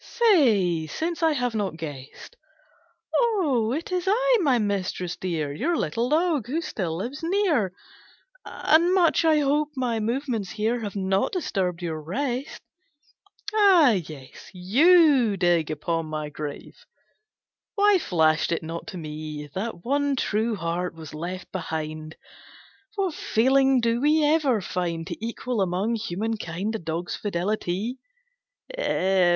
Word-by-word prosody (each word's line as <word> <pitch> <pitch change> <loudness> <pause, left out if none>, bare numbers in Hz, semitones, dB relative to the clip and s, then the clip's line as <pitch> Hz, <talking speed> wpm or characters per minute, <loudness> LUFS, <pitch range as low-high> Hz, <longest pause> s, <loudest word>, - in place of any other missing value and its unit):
Say 220 - +3
since 325 - -3
I 320 -1 +3
have 245 -4 -1
not 200 -6 -2
guessed!" 145 -5 -9 0.8
"O 320 - +2
it 315 +7 -3
is 365 0 -1
I, - - +3
my 275 -7 +3
mistress 190 -4 -2
dear, 160 -6 -3
Your 330 - 0
little 235 +2 -1
dog, 310 -5 +1
who 295 +6 -1
still 180 - -3
lives 245 - -5
near, 330 - +1 0.7
And 340 +4 +2
much 345 -2 +3
I 310 -2 +4
hope 295 +1 +1
my 245 -4 -1
movements 230 -3 -2
here 225 +4 -1
Have 210 -3 -6
not 195 0 0
disturbed 185 - -2
your 160 -2 -3
rest?" 250 - -4 0.9
"Ah 380 - +6
yes! 155 -9 -6
You 260 - +4
dig 175 -3 +2
upon 165 +1 -2
my 155 -1 -4
grave... 150 -1 -8 0.9
Why 410 -2 +4
flashed 160 - +2
it 170 - -1
not 165 +1 -6
to 185 - -7
me 150 -2 -7
That 190 -2 -5
one 285 +2 +1
true 220 -2 0
heart 175 -1 -3
was 160 -2 -10
left 175 +4 -6
behind! 155 -3 -5 0.8
What 385 -5 -1
feeling 265 +2 +3
do 230 +1 +1
we 305 +2 +3
ever 295 -7 +2
find 170 -2 -3
To 185 +4 -7
equal 235 0 -2
among 190 +5 0
human 225 0 -2
kind 190 +4 -4
A 225 - -3
dog's 165 +1 -4
fidelity!" 205 +4 -2
220 Hz, 135 wpm, -25 LUFS, 170-290 Hz, 0.9 s, Ah